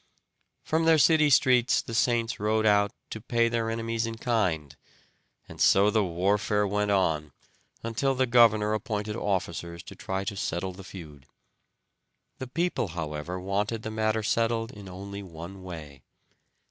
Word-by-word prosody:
From 160 +1 0
their 165 -1 +6
city 155 0 +5
streets 125 -2 +4
the 115 - -6
saints 115 0 +1
rode 110 +1 +1
out 100 -1 +4 0.2
to 110 - -6
pay 115 0 +1
their 115 -1 -1
enemies 115 0 -2
in 115 0 -5
kind, 90 - -1 0.7
and - - -9
so 100 +2 +5
the 110 -1 +2
warfare 100 +4 +1
went 105 +1 0
on 80 -7 +1 0.5
until 125 +4 0
the 130 0 +2
governor 110 -3 +4
appointed 105 -1 -3
officers 85 -5 -3
to - - -11
try 95 0 -3
to 100 +1 -4
settle 95 0 -2
the 95 +2 -11
feud. 80 -8 -11 1.1
The 130 - -5
people, 165 - -1
however, 85 +1 -5
wanted 105 +4 -2
the 110 - -4
matter 110 0 0
settled 115 +1 0
in 100 -4 -11
only 100 +2 -7
one 90 +1 -9
way. 80 -7 -9
105 Hz, 150 wpm, -27 LUFS, 95-115 Hz, 1.1 s, their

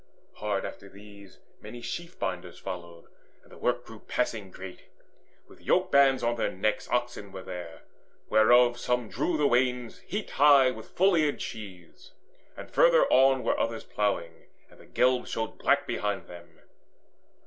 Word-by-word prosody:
Hard 105 -2 -2
after 100 - -9
these 100 -1 -15 0.2
Many 120 - -9
sheaf 170 +9 -6
binders 90 -2 -4
followed, 85 -2 -8 0.4
and - - -23
the - - -13
work 125 0 -1
Grew 110 -1 -12
passing 110 -5 -3
great. 95 0 -11 0.6
With - - -18
yoke - - +1
bands 135 -2 +4
on 120 0 0
their - - 0
necks 105 +3 -2
Oxen 120 -5 -2
were 95 -1 -8
there, 90 -3 -8 0.4
whereof 120 +3 +5
some 125 -3 -1
drew 170 - -1
the 150 - +1
wains 125 -2 +1
Heaped 205 +2 -5
high 140 -2 +6
with 110 -3 -10
full 190 +2 +3
eared 155 -4 +1
sheaves, 95 -6 -9 0.4
and - - -10
further - - +5
on 135 -1 +5
Were - - 0
others 115 -1 -2
ploughing, 85 -6 -3 0.2
and - - -19
the - - -17
glebe 125 0 +1
showed 110 -1 -4
black - - +2
Behind 105 -1 -3
them. 85 -1 -14
115 Hz, 160 wpm, -28 LUFS, 100-130 Hz, 0.6 s, high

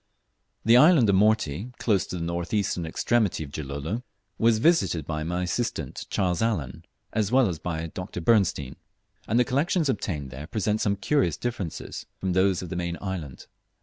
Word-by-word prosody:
The 115 +2 +7
island 150 -4 +6
of 100 - +4
Morty, 105 - +2
close 100 -5 +1
to - - -5
the 85 - -3
north 85 +4 -2
eastern 90 -5 0
extremity 105 0 +1
of 70 - -10
Gilolo, 75 - -4 0.4
was 115 -1 +4
visited 115 - +2
by 75 0 -3
my 90 +3 -2
assistant 90 - -3
Charles 90 -3 0
Allen, 85 - -2 0.3
as 105 -1 0
well 130 -2 +5
as 85 -4 -3
by 80 -2 -3
Dr. 90 +2 -6
Bernstein; 90 - +2 0.5
and 115 +3 +2
the 125 - +4
collections 150 +4 +1
obtained 75 - -2
there 70 +4 -8
present 110 +1 -1
some 100 -1 +1
curious 100 - +1
differences 110 -9 -5
from 95 -1 -2
those 95 0 +2
of 90 - -7
the 90 - -4
main 85 -1 -2
island. 90 -10 -6
95 Hz, 175 wpm, -26 LUFS, 80-115 Hz, 0.5 s, The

